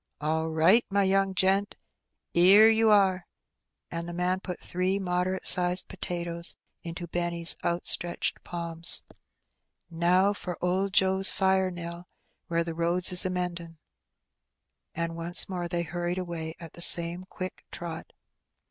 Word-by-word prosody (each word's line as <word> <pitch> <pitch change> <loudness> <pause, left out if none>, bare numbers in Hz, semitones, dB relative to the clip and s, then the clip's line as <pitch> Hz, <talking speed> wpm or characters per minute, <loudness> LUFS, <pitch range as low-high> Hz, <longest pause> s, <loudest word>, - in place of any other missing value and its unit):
'^ 150 - -4
All 160 +1 -1
right, 165 +9 +3
my 200 0 +1
young 195 0 0
gent, 195 +2 +1 0.6
'ere 200 +6 +6
you 225 0 +2
are; 190 -3 +2 0.3
'' - - -58
and 170 +1 -5
the - - -7
man 180 +1 -1
put 180 -2 -8
three 185 +2 -2
moderate 185 0 -3
sized 180 0 +4
potatoes 170 -1 -2 0.3
into 170 +1 -7
Benny's 170 0 +1
outstretched 175 0 -1
palms. 170 -1 +2 0.9
'^Now 180 +4 +1
for 180 -3 -7
old 190 +2 -1
Joe's 190 0 +4
fire, 190 -1 0
Nell, 175 0 -9 0.4
where 170 0 -1
the 165 -1 -6
roads 170 +2 +1
is 180 0 +7
a - - -4
mend 180 -1 -4
in';" 165 -1 -13 1.2
and 165 0 -4
once 170 +1 +3
more 180 -2 -5
they 170 0 -2
hurried 175 +1 -4
away 170 -3 -6
at 165 -1 -11
the 170 - -11
same 170 +1 +2
quick 185 -1 -8
trot. 165 -2 -7
175 Hz, 150 wpm, -26 LUFS, 170-190 Hz, 1.2 s, is